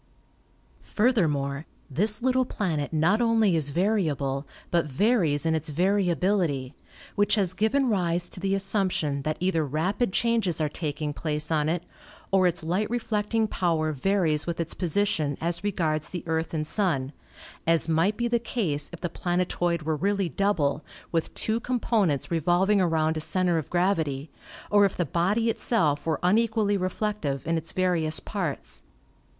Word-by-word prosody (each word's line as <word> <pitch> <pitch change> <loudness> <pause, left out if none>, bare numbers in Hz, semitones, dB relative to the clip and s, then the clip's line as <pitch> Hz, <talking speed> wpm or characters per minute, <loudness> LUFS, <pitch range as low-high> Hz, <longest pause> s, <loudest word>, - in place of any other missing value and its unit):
Furthermore, 155 - 0 0.2
this 210 - +2
little 260 0 +3
planet 165 - -2
not 165 +8 +2
only 225 -5 +3
is 150 -3 +2
variable 150 -7 0 0.2
but 170 -3 +2
varies 165 - +2
in 160 - +2
its 160 0 -1
variability, 175 -5 +1 0.4
which 205 +1 +2
has 190 -4 +1
given 235 +8 +1
rise 175 -5 +1
to - - -9
the 195 +1 0
as 195 - 0
sumption 185 -8 0
that 155 +1 -2
either 180 -2 +1
rapid 180 - -1
changes 225 -7 +1
are 155 - +1
taking 150 -1 -4
place 150 +1 -3
on 155 -1 +1
it, 170 +1 -1 0.5
or 190 -2 +4
its 175 -1 -1
light 185 +6 -1
reflecting 225 -1 0
power 165 -6 0
varies 160 0 +1
with 170 -1 -3
its 165 -1 -2
position 165 -5 0
as 170 +2 -2
re 205 - 0
gards 155 -4 -1
the 175 - -5
Earth 160 0 -1
and 155 -2 -2
Sun, 150 -6 -1 0.5
as 165 -1 +3
might 165 +6 +2
be 240 - 0
the 235 0 +1
case 175 - -2
if 175 - -10
the 175 - -1
planetoid 175 -1 -1
were 155 0 0
really 195 +3 0
double, 155 -5 0 0.3
with 165 -2 -1
two 220 +1 0
components 220 - 0
re 165 - +1
volving 190 +5 +3
around 160 -2 +1
a - - -2
center 180 0 +1
of 155 - -7
gravity, 160 -6 0 0.4
or 205 -1 +6
if 200 - +1
the 175 - +1
body 200 - +1
itself 165 -11 0
were 160 -2 0
unequally 215 +2 +2
reflective 185 - -2
in 165 +1 0
its 165 0 -4
various 170 -4 0
parts. 180 -9 -4
175 Hz, 160 wpm, -26 LUFS, 155-205 Hz, 0.5 s, or